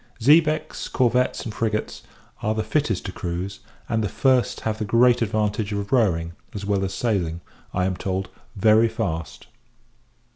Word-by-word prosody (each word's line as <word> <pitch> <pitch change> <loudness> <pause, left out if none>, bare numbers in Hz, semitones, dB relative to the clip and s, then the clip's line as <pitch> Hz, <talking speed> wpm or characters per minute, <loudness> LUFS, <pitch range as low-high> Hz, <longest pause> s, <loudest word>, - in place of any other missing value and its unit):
Xebecs, 155 +5 +3
corvettes, 125 0 +1
and 110 - -5
frigates, 110 0 -2 0.4
are 110 +1 0
the 110 - -1
fittest 110 -2 0
to 95 - -3
cruize; 90 +2 -4 0.3
and 110 -1 0
the 105 - -1
first 130 +4 +2
have 110 -1 -2
the - - -1
great 120 +3 +4
advantage 110 -1 0
of 100 0 -3
rowing, 85 -9 +2 0.2
as 100 -1 -4
well 100 -1 +1
as 95 - -2
sailing, 95 -7 -1 0.3
I 90 0 0
am 95 0 0
told, 95 +2 -3 0.3
very 110 +3 +5
fast. 85 -8 -4
105 Hz, 155 wpm, -23 LUFS, 95-115 Hz, 0.4 s, very